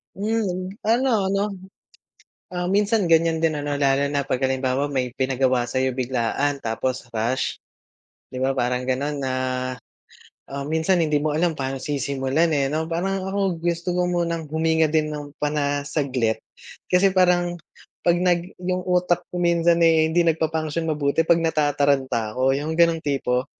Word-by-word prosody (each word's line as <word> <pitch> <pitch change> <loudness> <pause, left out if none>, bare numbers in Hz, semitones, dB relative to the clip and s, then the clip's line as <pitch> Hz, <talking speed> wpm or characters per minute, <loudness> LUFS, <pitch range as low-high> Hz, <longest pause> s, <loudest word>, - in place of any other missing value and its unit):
Hmm. 195 -3 -1 0.2
Ano-ano? 210 -4 +1 0.9
Ah, 180 -1 -4
minsan 205 +1 +2
ganyan 165 0 +3
din 155 -2 +1
ano 145 0 -2
lalo 140 0 +2
na 140 0 -1
'pag 130 - -2
halimbawa 130 +1 0
may 130 -3 -2
pinagawa 130 -2 +1
sa'yo 130 +1 0
biglaan, 130 +2 -1
tapos 120 +2 -3
rush, 115 +4 -1 0.7
'di 130 - -5
ba, 135 +1 0
parang 125 +1 -1
ganon 140 +3 -1
na, 130 -1 -2 1.2
ah, 140 0 -5
minsan 160 +5 +1
hindi 150 -3 +1
mo 150 0 0
alam 170 0 +1
paano 135 -2 -3
sisimulan, 140 +2 0
eh, 135 0 0
'no? 160 +1 -2
Parang 190 +3 -1
ako 190 -4 -1
gusto 170 +1 -1
ko 180 0 +1
munang 170 -3 -2
huminga 160 0 +2
din 155 -1 0
ng 145 0 -8
pana 145 -1 -1
saglit. 130 -7 -1 0.5
Kasi 185 +1 +4
parang 180 -1 +3 0.5
'pag 175 0 +3
nag 175 0 0
yung 180 0 -2
utak 180 -1 +1
ko 180 - -6
minsan, 170 -1 +3
eh, 160 -1 +4
hindi 170 +1 +2
nag 165 -1 +1
pa-function 160 0 -1
mabuti 145 0 +1
'pag 165 +1 +3
natataranta 140 -7 +1
ako 130 +2 +2
yung 150 +3 -3
ganong 165 0 +3
tipo, 130 -2 0
155 Hz, 155 wpm, -23 LUFS, 135-175 Hz, 1.2 s, Kasi